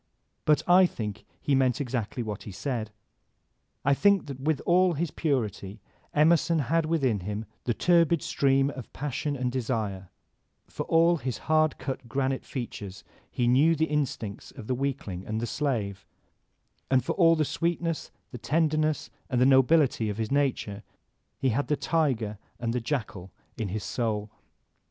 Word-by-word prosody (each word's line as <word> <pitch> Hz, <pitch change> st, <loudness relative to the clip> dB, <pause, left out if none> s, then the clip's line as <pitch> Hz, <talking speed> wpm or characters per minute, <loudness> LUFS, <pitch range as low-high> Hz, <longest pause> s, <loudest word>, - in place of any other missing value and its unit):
But 150 Hz, -2 st, +3 dB
I 180 Hz, +1 st, +7 dB
think 105 Hz, -, -6 dB
he 145 Hz, -, 0 dB
meant 130 Hz, -2 st, +3 dB
exactly 125 Hz, -3 st, -2 dB
what 105 Hz, -2 st, -5 dB
he 105 Hz, -, -8 dB
said. 110 Hz, +2 st, -3 dB, 1.0 s
I 140 Hz, -, +5 dB
think 200 Hz, +5 st, +3 dB
that 140 Hz, -3 st, -7 dB
with 150 Hz, +1 st, 0 dB
all 180 Hz, 0 st, +4 dB
his 160 Hz, +1 st, -2 dB
purity 110 Hz, -, -2 dB, 0.3 s
Emerson 165 Hz, +2 st, +4 dB
had 160 Hz, +3 st, +1 dB
within 135 Hz, -10 st, +1 dB
him 105 Hz, +4 st, -4 dB, 0.2 s
the 120 Hz, -, 0 dB
turbid 170 Hz, -2 st, +3 dB
stream 135 Hz, 0 st, +2 dB
of 130 Hz, -5 st, -9 dB
passion 145 Hz, +1 st, -3 dB
and 125 Hz, -2 st, -1 dB
desire; 110 Hz, -7 st, -2 dB, 0.6 s
for -, -, -6 dB
all 170 Hz, +1 st, +4 dB
his 130 Hz, -4 st, -3 dB
hard 155 Hz, -1 st, +2 dB
cut 130 Hz, -1 st, -5 dB
granite 135 Hz, 0 st, -1 dB
features 105 Hz, -6 st, -6 dB, 0.3 s
he 120 Hz, -2 st, 0 dB
knew 145 Hz, +7 st, +5 dB
the 160 Hz, +1 st, +2 dB
instincts 135 Hz, -9 st, -3 dB
of -, -, -10 dB
the 130 Hz, -, -1 dB
weakling 125 Hz, -9 st, -3 dB
and 110 Hz, +1 st, -2 dB
the 120 Hz, -, -1 dB
slave; 110 Hz, -7 st, -2 dB, 0.8 s
and 130 Hz, -2 st, +3 dB
for -, -, 0 dB
all 165 Hz, -3 st, +5 dB
the 155 Hz, -1 st, +1 dB
sweetness, 165 Hz, +1 st, -2 dB, 0.2 s
the 125 Hz, -, -7 dB
tenderness, 155 Hz, +1 st, 0 dB, 0.2 s
and 125 Hz, -, +1 dB
the 125 Hz, -, +5 dB
nobility 135 Hz, -3 st, +4 dB
of 105 Hz, -, -4 dB
his 110 Hz, +1 st, -3 dB
nature, 130 Hz, -7 st, 0 dB, 0.6 s
he 135 Hz, -, +1 dB
had 130 Hz, +5 st, 0 dB
the 150 Hz, -, +1 dB
tiger 120 Hz, -11 st, 0 dB, 0.2 s
and 115 Hz, -1 st, -1 dB
the 125 Hz, -, -1 dB
jackal 110 Hz, -8 st, -3 dB, 0.3 s
in 110 Hz, -3 st, -3 dB
his 100 Hz, +2 st, -4 dB
soul. 110 Hz, -3 st, -2 dB
130 Hz, 160 wpm, -27 LUFS, 110-155 Hz, 1.0 s, I